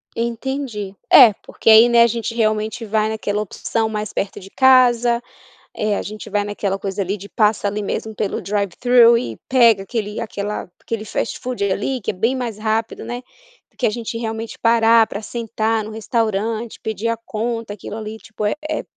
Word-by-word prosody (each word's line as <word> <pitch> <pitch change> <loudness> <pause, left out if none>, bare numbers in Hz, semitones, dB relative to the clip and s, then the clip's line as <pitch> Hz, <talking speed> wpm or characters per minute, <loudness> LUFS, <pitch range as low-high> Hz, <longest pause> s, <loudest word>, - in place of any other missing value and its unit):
Entendi. 235 -3 -3 0.2
É, 245 -6 +9
porque - - 0
aí 220 +2 +8
né, 235 -1 +6
a 235 - +7
gente 230 0 -3
realmente 215 0 0
vai 215 0 +1
naquela 210 -1 -2
opção 220 +2 -2
mais 215 -1 -4
perto 195 - -3
de 195 0 -12
casa, 245 -2 +4 0.5
eh, 210 -1 0
a - - -2
gente 210 0 -8
vai 205 0 0
naquela 205 -1 -2
coisa 195 0 -3
ali 195 +2 -3
de 200 +2 -10
passa 210 -1 +1
ali 210 +1 -3
mesmo 220 +2 -4
pelo 205 -2 -2
drive-thru 230 +4 +4
e 250 - -5
pega 235 -6 +5
aquele 210 0 -4
aquela 205 -3 -4
aquele 225 -2 -4
fast-food 245 +1 -3
ali 250 +7 -1
que 195 - -2
é - - -5
bem 225 +7 +1
mais 240 -5 -3
rápido, 220 +1 -2
né. 245 +1 -5 0.5
Porque 250 - -2
a - - +2
gente 230 +1 -5
realmente 225 0 -5
parar 230 -1 +5
pra 200 - -6
sentar 225 -1 -2
no 215 - -8
restaurante, 220 0 -2
pedir 220 +1 -3
a 230 - 0
conta, 230 -1 -4
aquilo 210 - -8
ali 220 0 -6
tipo 220 -1 -5
é 210 - +1 0.2
é 310 - -1
220 Hz, 185 wpm, -20 LUFS, 210-235 Hz, 0.5 s, É